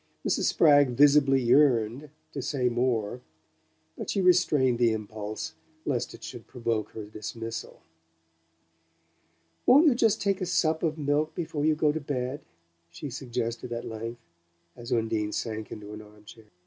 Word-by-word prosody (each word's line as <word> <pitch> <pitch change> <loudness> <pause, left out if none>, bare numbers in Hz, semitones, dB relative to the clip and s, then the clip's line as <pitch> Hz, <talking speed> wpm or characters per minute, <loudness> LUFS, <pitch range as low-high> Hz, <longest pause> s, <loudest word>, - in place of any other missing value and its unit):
Mrs. - - +1
Spragg 145 -5 +5
visibly 140 -2 +5
yearned 125 +1 +3 0.2
to 140 - -5
say 130 -1 0
more, 120 -1 -1 0.7
but - - -6
she 200 - 0
restrained 155 -9 +3
the 115 -2 +4
impulse 110 +6 -5 0.3
lest 125 -5 -2
it - - -15
should 120 - -9
provoke 115 -4 -2
her 110 - -6
dismissal. 110 +2 -7 1.8
"Won't 285 +6 +7
you 305 - +7
take 240 - -7 0.4
just - - -15
a - - 0
sup 160 -2 +1
of 160 -1 -1
milk 150 +1 0
before 155 -3 -2
you 155 0 +3
go 150 -1 +2
to 160 +1 -4
bed?" 135 0 -3 0.5
she 125 - -7
suggested 120 -1 -4
at 120 0 -4
length, 115 +1 -6 0.5
as 120 +1 -9
Undine 110 -3 0
sank 110 -1 -4
into 105 0 -8
an 105 - -8
armchair. 105 +1 -15
125 Hz, 150 wpm, -27 LUFS, 110-150 Hz, 1.8 s, Won't